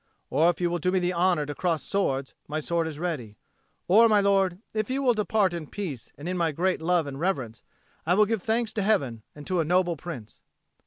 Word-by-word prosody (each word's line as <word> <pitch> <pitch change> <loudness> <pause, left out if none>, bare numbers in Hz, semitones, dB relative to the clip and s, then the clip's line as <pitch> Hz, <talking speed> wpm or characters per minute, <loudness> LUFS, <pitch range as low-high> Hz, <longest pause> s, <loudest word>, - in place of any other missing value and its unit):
Or 165 +3 +4
if 175 - -1
you 175 -1 +1
will 175 - -1
do 180 +3 +1
me 190 - +2
the 180 0 0
honour 175 -3 +2
to 145 - -5
cross 165 -1 -1
swords, 140 -9 -1
my 155 +1 -2
sword 165 +1 -1
is 155 -2 -6
ready. 150 -11 -4 0.5
Or, 225 +5 +6
my 210 -1 +5
lord, 195 -2 +2
if 215 +1 -1
you 270 +2 -1
will 250 -2 +4
depart 210 -3 +1
in 165 -3 -5
peace 150 - -6
and 145 - -7
in 180 0 -2
my 165 -2 +2
great 180 +3 0
love 170 -1 +2
and 140 -1 -6
reverence, 135 - -2 0.4
I 175 +3 +2
will 210 +2 +5
give 220 -1 -1
thanks 225 +2 0
to 215 - -1
Heaven 140 - +1
and 145 -1 -10
to 185 -2 0
a - - +3
noble 175 +1 +2
Prince." 140 -9 -9
175 Hz, 230 wpm, -26 LUFS, 155-195 Hz, 0.5 s, Or